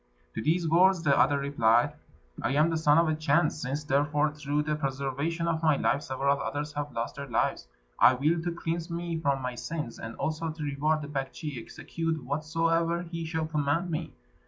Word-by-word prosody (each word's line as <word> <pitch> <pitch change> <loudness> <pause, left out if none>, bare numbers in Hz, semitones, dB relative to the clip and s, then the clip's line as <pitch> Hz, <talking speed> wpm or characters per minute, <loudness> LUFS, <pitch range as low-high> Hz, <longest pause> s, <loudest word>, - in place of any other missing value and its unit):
To - - -3
these 165 +5 +1
words 175 +2 +4
the 140 -2 +4
other 140 +2 +4
replied, 140 -1 +2 0.5
"I - - 0
am 155 +3 +4
the 165 - 0
Son 150 -1 +4
of 165 0 +4
a 155 - +2
Chan. 155 +1 +2
Since, 145 0 -4
therefore, 145 +1 +1
through 150 0 -1
the 150 0 -1
preservation 140 +4 -2
of 165 -1 0
my 155 -3 +3
life, 140 - +1
several 140 +1 0
others 150 +1 -3
have 145 0 -4
lost 115 +3 -4
their 140 0 -5
lives, 120 - 0 0.3
I 130 - +7
will, 155 +6 +1
to 175 +1 -2
cleanse 170 0 -3
me 170 -1 -3
from 140 -4 0
my 125 0 -2
sins, 145 0 -5
and 115 +1 -7
also 160 +1 -2
to 155 0 -6
reward 150 +2 0
the - - -6
Baktschi, 140 -1 -4
execute 165 +5 -4
whatsoever 165 +4 0
he 165 -1 -5
shall 160 0 -2
command 155 +3 0
me." 160 +1 -3
150 Hz, 195 wpm, -28 LUFS, 140-165 Hz, 0.5 s, I